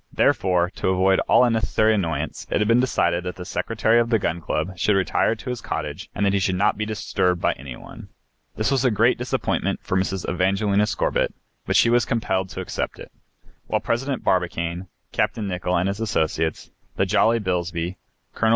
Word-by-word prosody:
Therefore, 90 -1 +2
to - - -1
avoid 95 +1 +3
all - - +6
unnecessary 110 -2 +2
annoyance, 80 -7 -2
it - - +1
had 105 - +1
been 115 +2 +4
decided 85 -9 +1
that 90 0 -5
the 90 - -8
Secretary 115 +4 +1
of 115 0 +1
the 115 - +4
Gun 85 -4 -2
Club 95 +3 -2
should 100 +4 +2
retire 95 +3 +1
to 125 +3 -6
his 125 - -5
cottage - - -5
and 100 - 0
that 100 - +2
he 100 - +2
should 95 -1 0
not 105 +3 +2
be 105 +1 -3
disturbed 90 -4 0
by - - +1
any 65 -1 -9
one. - - -12 0.5
This 110 +4 0
was 135 -2 +2
a 130 - +4
great 105 - +2
disappointment - - -1
for - - -2
Mrs. 95 0 -1
Evangelina 100 +3 +1
Scorbitt, 100 - 0 0.3
but - - 0
she 115 - +5
was 120 0 +4
compelled 95 -5 -1
to - - -6
accept - - -4
it. - - -11 0.6
While - - +1
President 130 +2 -2
Barbicane, 90 0 -1 0.2
Capt. - - 0
Nicholl 90 -4 -1
and 90 +2 +1
his 100 +2 -2
associates, 80 -7 -1 0.2
the 95 - +1
jolly 110 +4 +3
Bilsby, 90 -2 -2 0.4
Col. 110 - +1
95 Hz, 195 wpm, -23 LUFS, 90-110 Hz, 0.6 s, all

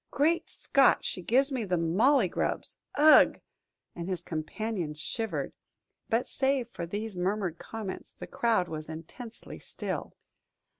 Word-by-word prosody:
"Great 320 +4 +1
Scott; 275 -1 +3
she 185 - -1
gives 265 +9 +3
me 255 -4 -1
the 180 -3 0
mauley 205 - +4
grubs! - - -2 0.2
Ugh!" 305 +1 +7 0.6
and 170 +1 -5
his 185 -2 -2
companion 165 +1 -3
shivered. 160 - -3 0.6
But 230 +2 +2
save 265 -3 0
for 170 -8 -6
these 205 +1 -4
murmured 185 -2 -1
comments, 215 -4 -6
the - - -9
crowd 225 -6 +1
was 155 -1 -6
intensely 195 +9 -9
still. - - -5
210 Hz, 135 wpm, -29 LUFS, 170-245 Hz, 0.6 s, Ugh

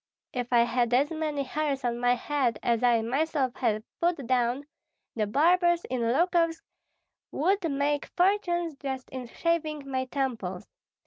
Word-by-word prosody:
If 245 -1 -3
I 240 -1 +6
had 240 0 +1
as 280 +5 +2
many 305 -3 -2
hairs 280 0 -2
on 240 0 -1
my 245 0 +3
head 250 -3 0
as 235 -2 +1
I 240 -2 +3
myself 270 +1 0
have 220 -4 0 0.2
put 335 -6 +1
down, 250 +2 +1 0.5
the 215 -2 0
barbers 345 - +3
in 255 -2 -1
Lukovsk 330 +7 +2 0.7
would 360 +3 +1
make 285 +1 0
fortunes 350 -4 +1
just 265 -2 -5
in 255 -2 -6
shaving 310 0 -1
my 260 -1 -1
temples. 235 -9 -3
275 Hz, 145 wpm, -28 LUFS, 245-320 Hz, 0.7 s, I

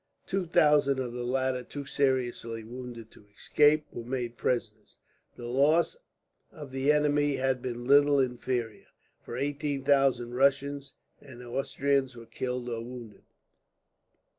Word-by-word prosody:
Two 190 -2 -2
thousand 150 -4 +4
of 125 -2 -3
the 125 0 -4
latter, 130 +1 0
too 140 +3 -8
seriously 125 -5 -1
wounded 120 -1 -9
to 105 - -19
escape, 150 +5 +3
were 120 - -7
made 120 -1 -4
prisoners. 110 -4 -3 0.4
The 120 - -9
loss 145 - +2 0.6
of 150 -7 -10
the 135 +2 +2
enemy 145 -1 +2
had 130 -1 0
been 120 -1 -5
little 145 +1 +5
inferior, 125 -3 -2 0.3
for 120 - -7
eighteen 145 0 -2
thousand 135 -4 +2
Russians 140 +1 +1 0.3
and 125 -3 -12
Austrians 135 +1 -1
were 115 -1 -11
killed 125 +1 -4
or 115 -2 -3
wounded. 120 -3 -10
130 Hz, 135 wpm, -29 LUFS, 120-140 Hz, 0.6 s, little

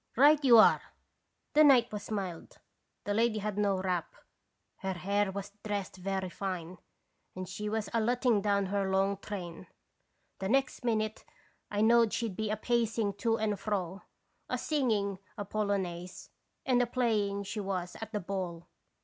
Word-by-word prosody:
Right 295 +3 +6
you 245 -4 +8
are! 220 - +7 0.7
The 305 - +7
night 255 -5 +6
was 205 -1 -6
mild, 190 -6 -5 0.5
the 205 - -1
lady 225 +1 +2
had 210 -1 -2
no 200 -2 +2
wrap, 185 -2 -2 0.6
her 190 0 -3
hair 200 +2 0
was 200 +1 -6
dressed 200 -3 -3
very 190 0 -2
fine, 180 -2 -5 0.6
and 185 0 -5
she 210 +3 -4
was 220 0 -2
a 230 - +2
letting 240 -1 +2
down 200 -1 +1
her 195 0 -1
long 195 +1 +2
train. 185 -4 -7 0.7
The 190 - -2
next 270 +1 +1
minute 215 -2 -1 0.5
I 205 0 -1
knowed 230 0 +5
she 230 -2 -1
'd 190 - -9
be 215 +1 -2
a 215 - -1
pacing 225 -2 0
to 225 +1 +1
and 210 -2 -1
fro, 195 -3 -2 0.5
a - - 0
singing 215 -10 0 0.2
a 205 - -4
polo 205 0 0
naise, 180 -1 -6 0.4
and 250 -2 +3
a 245 - +1
playing 215 -5 0
she 210 +2 -5
was 185 -3 -3
at 220 -1 -6
the 210 - -1
ball. 180 -2 -4
205 Hz, 165 wpm, -31 LUFS, 190-225 Hz, 0.7 s, you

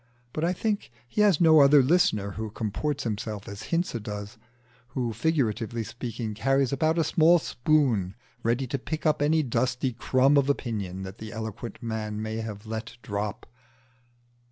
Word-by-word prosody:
But 155 - -2
I 170 - +2
think 205 +3 -2 0.2
he 210 - 0
has 200 -7 +5
no 160 -2 +7
other 140 0 +7
listener 125 - +2
who 110 +2 -5
comports 130 +7 -2
himself 105 -2 -4
as 100 0 -7
Hinze 165 -9 0
does 105 +2 -7 0.6
who, 120 -3 -1
figuratively 115 -4 0
speaking, 115 0 -5
carries 135 +5 +1
about 155 +4 +1
a 165 - +3
small 165 +2 +5
spoon 120 - +1 0.3
ready 120 +4 +1
to 135 +2 -3
pick 155 +5 -5
up 155 -2 +2
any 155 +2 +3
dusty 125 0 0
crumb 130 +4 +3
of 140 0 +3
opinion 100 -9 -2
that 95 +3 -8
the 110 0 -7
eloquent 110 +1 -6
man 110 -2 -3
may 110 0 -3
have 110 -2 -6
let 110 +2 -6
drop. 100 -1 -3
120 Hz, 160 wpm, -27 LUFS, 110-145 Hz, 0.6 s, no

